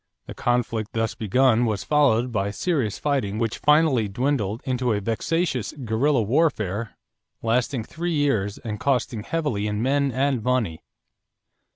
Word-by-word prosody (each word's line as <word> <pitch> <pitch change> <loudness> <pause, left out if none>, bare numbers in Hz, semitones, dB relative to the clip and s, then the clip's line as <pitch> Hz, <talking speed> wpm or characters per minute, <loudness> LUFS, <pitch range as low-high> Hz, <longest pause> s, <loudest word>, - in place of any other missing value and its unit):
The - - -8
conflict 115 -3 -1
thus 115 0 -1
begun 120 +2 +2
was 105 -4 -1
followed 125 -2 +2
by 100 -2 -1
serious 130 - -1
fighting 130 -9 -1
which 115 -1 -2
finally 150 -7 +3
dwindled 115 -1 -1
into 125 -2 0
a 105 - 0
vexatious 130 - -1
guerrilla 130 0 +1
warfare 115 - 0 0.5
lasting 120 +2 0
three 170 +8 -4
years 110 -9 0
and 105 -2 -6
costing 125 -4 0
heavily 120 -6 -2
in 105 0 -2
men 140 +1 +1
and 130 0 0
money. 115 -9 0
120 Hz, 140 wpm, -24 LUFS, 110-140 Hz, 0.5 s, finally